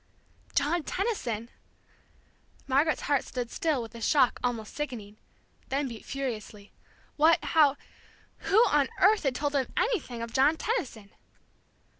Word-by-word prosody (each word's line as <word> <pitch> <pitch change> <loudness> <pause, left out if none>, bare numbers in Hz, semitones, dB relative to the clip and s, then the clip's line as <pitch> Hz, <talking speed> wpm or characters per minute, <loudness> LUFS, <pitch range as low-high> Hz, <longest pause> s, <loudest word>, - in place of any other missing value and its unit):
John 300 +5 +2
Tenison! 255 - -3 1.2
Margaret's 285 +4 +2
heart 285 -2 +1
stood 245 -2 -5
still 300 -7 0
with 225 - -10
a 230 - -9
shock 260 +1 +3
almost 235 -3 -2
sickening, 225 -8 -6 0.5
then 275 +1 0
beat 230 -4 -9
furiously. 220 -6 -5 0.5
What 320 +3 +6
how 295 -4 +4 0.6
who 390 - 0
on 290 -3 +2
earth 415 +2 +5
had 270 -4 0
told 290 +1 -1
them 270 -3 +1
anything 260 - -1
of 230 - -7
John 290 +5 +4
Tenison? 245 - -3
270 Hz, 130 wpm, -28 LUFS, 235-305 Hz, 1.2 s, What